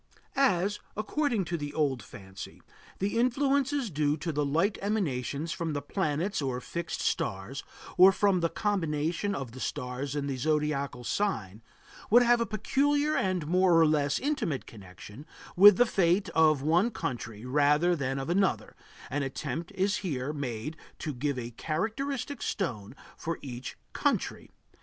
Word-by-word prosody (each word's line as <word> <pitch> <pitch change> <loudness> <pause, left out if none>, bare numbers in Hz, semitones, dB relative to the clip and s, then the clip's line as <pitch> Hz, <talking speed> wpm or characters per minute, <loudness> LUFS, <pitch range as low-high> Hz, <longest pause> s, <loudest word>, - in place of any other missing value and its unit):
As, 205 -7 +2 0.2
according 235 -2 0
to 170 +1 -2
the 145 -1 -6
old 140 -6 +1
fancy, 95 -1 -10 0.3
the 205 +4 0
influences 275 0 +1
due 150 0 +1
to 165 +2 -3
the 150 -1 0
light 165 +9 +1
emanations 160 - -1
from 165 -1 -2
the 145 - -2
planets 165 +3 -1
or 130 -3 -2
fixed 170 +5 -4
stars, - - -2 0.3
or 185 +2 +9
from 195 -1 +2
the 165 -1 +1
combination 175 -1 -1
of 135 -4 -5
the 130 - -10
stars 130 +1 -3
in 145 -1 -2
a 135 - -2
zodiacal 145 -3 -1
sign, 115 - -2 0.5
would 240 +3 +7
have 240 0 +4
a 235 - 0
peculiar 285 +8 +1
and 185 -4 0
more 180 +1 +4
or 165 - +6
less 150 -2 +2
intimate 270 - -1
connection 105 +4 -12 0.3
with 200 +1 +9
the 245 - +6
fate 190 -3 +2
of 155 -4 +3
one 170 +9 +3
country 120 - -5
rather 150 +6 +3
than 135 -3 -2
of 135 +1 -3
another, 190 +3 0 0.4
an 145 +2 0
attempt 140 +4 -4
is 195 +2 +1
here 145 -6 -3
made 135 0 -4 0.2
to 150 - -4
give 140 +2 -2
a 120 -1 -5
characteristic 245 - -3
stone 120 - -3 0.2
for 165 0 -4
each 125 -2 -7 0.2
country. - - -1
160 Hz, 150 wpm, -29 LUFS, 140-200 Hz, 0.5 s, or